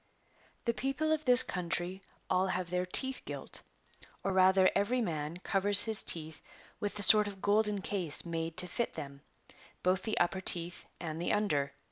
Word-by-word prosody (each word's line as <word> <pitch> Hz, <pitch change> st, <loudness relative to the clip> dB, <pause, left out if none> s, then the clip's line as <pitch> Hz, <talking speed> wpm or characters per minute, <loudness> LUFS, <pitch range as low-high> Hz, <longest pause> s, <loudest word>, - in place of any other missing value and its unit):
The 235 Hz, -, 0 dB
people 275 Hz, +6 st, -2 dB
of 310 Hz, -1 st, -1 dB
this 250 Hz, 0 st, +7 dB
country 180 Hz, +1 st, -3 dB, 0.3 s
all 185 Hz, +1 st, 0 dB
have 185 Hz, -2 st, -4 dB
their 180 Hz, 0 st, -2 dB
teeth 265 Hz, +8 st, 0 dB
gilt; -, -, -8 dB, 0.6 s
or 195 Hz, -, -2 dB
rather 190 Hz, 0 st, +4 dB
every 205 Hz, +6 st, 0 dB
man 160 Hz, -6 st, -4 dB
covers 200 Hz, +2 st, +6 dB
his 220 Hz, -2 st, -1 dB
teeth 160 Hz, -2 st, -2 dB, 0.4 s
with 205 Hz, 0 st, -4 dB
a 205 Hz, -, -4 dB
sort 210 Hz, +2 st, +6 dB
of 200 Hz, -1 st, -8 dB
golden 205 Hz, 0 st, 0 dB
case 180 Hz, -7 st, +2 dB
made 165 Hz, 0 st, -5 dB
to 180 Hz, -, +2 dB
fit 235 Hz, +6 st, -4 dB
them, 140 Hz, -1 st, -9 dB, 0.6 s
both 185 Hz, +1 st, +1 dB
the 220 Hz, +2 st, -4 dB
upper 180 Hz, +2 st, 0 dB
teeth 175 Hz, -1 st, -1 dB
and 160 Hz, -1 st, -6 dB
the 175 Hz, -, -1 dB
under. 145 Hz, -10 st, -1 dB
190 Hz, 170 wpm, -31 LUFS, 175-210 Hz, 0.6 s, this